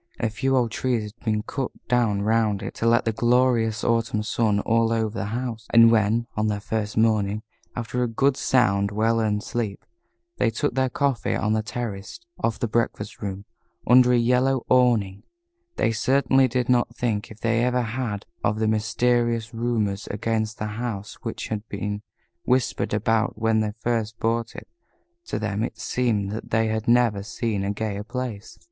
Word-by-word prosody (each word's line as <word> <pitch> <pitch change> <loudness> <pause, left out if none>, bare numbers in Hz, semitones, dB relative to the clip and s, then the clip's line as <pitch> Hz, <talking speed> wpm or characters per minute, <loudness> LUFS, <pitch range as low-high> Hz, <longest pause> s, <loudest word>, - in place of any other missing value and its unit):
A 115 - 0
few 135 +5 +1
old 120 -3 +1
trees 120 -2 0
had - - -28
been 110 -2 0
cut 135 +1 -3 0.2
down 115 -5 +2
round 110 -2 +1
it - - -5
to 115 - -1
let 115 0 +5
in 115 - +2
the - - -13
glorious 120 -2 +2
autumn 115 -2 +1
sun 110 -1 +1
all 115 +1 +2
over 110 -1 +1
the 95 - -2
house, 115 0 -4
and 115 0 +7
when, 110 +1 +2
on 110 0 0
their 105 -1 -1
first 105 0 -3
morning, 110 -1 +2 0.3
after 120 +1 -3
a 125 - +2
good 135 +4 +2
sound, 100 -8 +2
well 110 +2 +1
earned 105 -1 0
sleep, 110 -5 -4 0.5
they - - +2
took 125 +5 -1
their 130 0 +1
coffee 140 -1 0
on 105 0 0
the 110 - +1
terrace 110 - -5 0.2
off 115 - 0
the 120 - -1
breakfast 105 -2 -2
room, 100 0 -5 0.4
under 125 0 +6
a 125 - +4
yellow 125 +2 +2
awning, 115 -6 +3 0.5
they - - +1
certainly 130 +3 +3
did 125 0 -1
not 125 -1 +2
think, 110 -3 -1
if 110 - -12
they 115 +1 +1
ever 125 0 +1
had, 110 -3 -3 0.2
of 105 - +1
the 110 0 +1
mysterious 115 +1 +1
rumors 115 -4 -1
against 110 +1 -2
the 110 - -3
house 110 -2 -5
which - - -5
had 110 -2 -2
been 105 0 -3 0.4
whispered 130 0 0
about 110 +2 +1
when 110 0 +2
they 105 -1 -1
first 115 -1 -2
bought 115 +1 -1
it. - - -9 0.6
To - - -3
them 105 -1 -2
it - - -4
seemed 110 -6 -1
that 110 - -6
they 110 0 +2
had 110 0 -2
never 120 -4 +3
seen 105 -1 -2
a 100 - -1
gayer 105 -1 -3
place. 120 -2 -6
115 Hz, 180 wpm, -24 LUFS, 105-120 Hz, 0.6 s, and